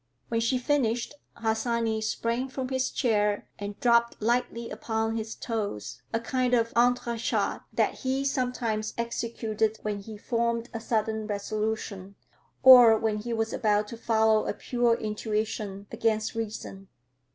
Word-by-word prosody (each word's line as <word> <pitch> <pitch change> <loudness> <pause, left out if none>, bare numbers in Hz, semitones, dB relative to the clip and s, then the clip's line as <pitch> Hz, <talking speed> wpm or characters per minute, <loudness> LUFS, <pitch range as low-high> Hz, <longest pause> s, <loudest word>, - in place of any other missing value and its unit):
When 230 - +1
she 230 +3 +1
finished, 250 -2 0 0.2
Harsanyi 225 0 0
sprang 230 +4 -1
from 260 -1 -4
his 260 -1 0
chair 210 -4 +1
and 205 0 -6
dropped 235 -1 +3
lightly 235 +1 -1
upon 225 0 -2
his 225 0 -4
toes, 200 - -4
a 225 - 0
kind 250 +1 +1
of 230 -1 +1
entre 240 0 +2
chat - - 0
that - - 0
he 270 +1 -1
sometimes 245 -5 -1
executed 225 -2 -1
when 210 -1 -2
he 210 +1 -9
formed 235 +1 -1
a 225 - -3
sudden 220 -1 -1
resolution, 205 -2 -3 0.5
or 245 -4 +10
when 215 -1 0
he 235 +3 -5
was 225 -1 -1
about 210 -1 +1
to - - -6
follow 220 -1 +2
a - - 0
pure 240 -2 +1
intuition, 210 -2 -3
against 220 -1 0
reason. 210 -3 -5
225 Hz, 140 wpm, -27 LUFS, 215-235 Hz, 0.5 s, or